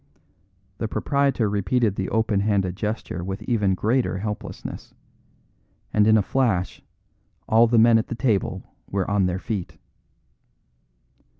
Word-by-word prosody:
The 115 - -1
proprietor 140 -1 0
repeated 105 +2 0
the 95 -1 -3
open 110 -2 +1
handed 100 -3 0
gesture 105 -4 -4
with 95 +2 -5
even 105 -6 +1
greater 115 +1 0
helplessness 105 +2 -6 1.0
and 105 0 +4
in 110 0 +6
a 105 - +2
flash 105 -8 0 0.7
all 115 +2 +5
the 115 +1 +2
men 115 0 +6
at 110 - -3
the 120 - -4
table 115 -6 0 0.3
were 95 -1 -1
on 100 -2 +2
their 90 0 -1
feet. 95 -6 -5
105 Hz, 130 wpm, -23 LUFS, 95-115 Hz, 1.0 s, in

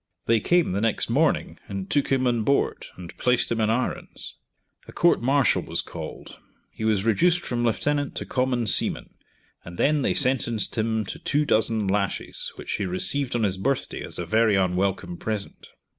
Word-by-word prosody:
They 115 -1 +3
came 175 - +2
the 100 +2 -1
next 115 -1 +1
morning - - +1
and 100 -1 -5
took 145 +4 0
him 130 -1 +2
on 120 -2 +1
board, 140 +6 0
and 90 -2 -10
placed 125 -1 +2
him 115 -1 0
in 110 - +2
irons. 125 +3 -3 0.5
A - - -10
court 175 - +3
martial 135 +2 +3
was - - -1
called; - - -9 0.3
he - - -8
was 110 -2 +1
reduced 175 - +3
from 120 -6 -2
lieutenant 145 +6 0
to - - -4
common 125 -2 0
seaman, 100 - 0 0.5
and 85 0 -10
then 150 0 +2
they - - +1
sentenced 120 -4 +2
him 110 -1 0
to - - -7
two 150 +1 0
dozen 110 -3 +1
lashes, 100 0 -2
which - - -7
he 100 - -2
received 125 +9 -1
on 115 - +1
his 95 -2 0
birthday 135 +8 -1
as - - -7
a - - -3
very 110 -1 +3
unwelcome 95 -1 0
present. 105 0 -5
115 Hz, 180 wpm, -25 LUFS, 100-130 Hz, 0.5 s, They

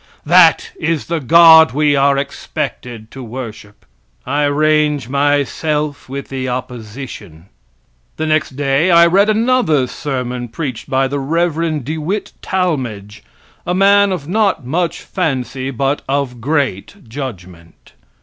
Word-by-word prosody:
That - - +5
is 165 - -1
the 170 -1 -2
God 160 +2 +7
we 145 0 +2
are 140 0 +3
expected 125 -4 -5
to 135 - -9
worship. 115 -4 -9 0.4
I 145 +3 0
range 150 -2 +1
myself 145 +1 -1
with 140 +1 -6
the 130 -1 -4
opposition. 120 - -8 0.7
The 160 - -2
next 155 -3 0
day 140 +4 +1
I 170 -1 +7
read 195 +5 +3
another 215 - +2
sermon 125 -3 -4
preached 130 -1 -6
by 135 0 +1
the 140 +1 -3
Rev. 160 0 -1
De 155 +3 -4
Witt 190 +7 -3
Talmage, 130 - -3 0.4
a 180 - -2
man 200 +1 +4
of 165 -6 -4
not 200 - 0
much 165 +6 -2
fancy, 135 - -3
but 135 +2 -1
of 135 -4 -2
great 140 - -2
judgment. 95 - -9
145 Hz, 130 wpm, -16 LUFS, 125-160 Hz, 0.7 s, God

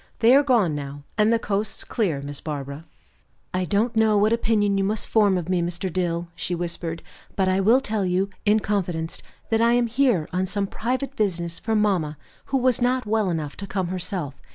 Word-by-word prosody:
"They 235 +2 +5
are 280 - +7
gone 235 - +2
now, 145 0 -6
and 215 +1 +3
the 230 - +4
coast's 210 -1 -2
clear, 165 -11 -1
Miss 145 0 -6
Barbara." 145 0 -5 0.7
"I 185 0 0
don't 215 +6 0
know 220 -1 +4
what 210 +2 +3
opinion 210 -3 +2
you - - +1
must 210 +3 -1
form 205 -4 +3
of 175 -2 -4
me, 180 -1 +1
Mr. 175 +1 -3
Dill," 175 -2 -1
she 175 +1 -3
whispered, 170 -1 -3 0.3
"but 190 -1 +1
I 185 +1 +2
will 225 +7 +5
tell 215 -6 -2
you, 185 +2 0
in 215 +1 +3
confidence, 175 -6 -2 0.3
that 225 0 +3
I 235 +1 +4
am 245 0 +3
here 235 - +2
on 185 +1 0
some 200 +1 -1
private 255 +7 -3
business 170 -6 -1
for 225 -1 -1
mamma, 185 -8 +1 0.3
who 270 - 0
was 255 -1 +2
not 250 0 +1
well 215 -2 +1
enough 155 -4 -3
to 200 - -6
come 190 -2 -2
herself. 180 -5 -3
195 Hz, 200 wpm, -24 LUFS, 170-220 Hz, 0.7 s, are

